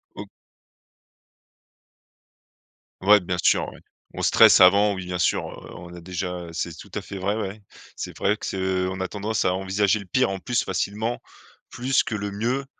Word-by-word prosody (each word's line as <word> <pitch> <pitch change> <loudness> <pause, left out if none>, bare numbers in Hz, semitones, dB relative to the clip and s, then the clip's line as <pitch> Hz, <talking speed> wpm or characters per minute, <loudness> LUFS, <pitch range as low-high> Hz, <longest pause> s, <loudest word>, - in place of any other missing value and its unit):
O - - -8 2.7
Ouais 105 +2 +6
bien 90 -1 -3
sûr - - +3
ouais. - - -14 0.4
On - - -4
stresse - - +7
avant, 100 +3 +6
oui 95 -1 -6
bien 90 0 -4
sûr, 85 - +1
heu, - - -11
on 85 0 -10
a 90 - -10
déjà, 90 0 -5
heu 85 - -10
c'est 85 0 -4
tout - - -12
à - - -2
fait 100 - -8
vrai, 100 +3 -1
ouais. 105 -1 -5 0.3
C'est - - -7
vrai 105 +2 +1
que - - -7
ce 95 -1 -1
on 95 0 -5
a 95 - -1
tendance 105 +3 -2
à 90 - +3
envisager 95 +2 +1
le 100 - -9
pire 95 +3 +1
en 95 - -4
plus 120 +4 -1
facilement, 105 +6 -2 0.5
plus 130 +2 +1
que 110 - -4
le 100 -1 -4
mieux 120 +7 -2
95 Hz, 190 wpm, -24 LUFS, 90-105 Hz, 2.7 s, stresse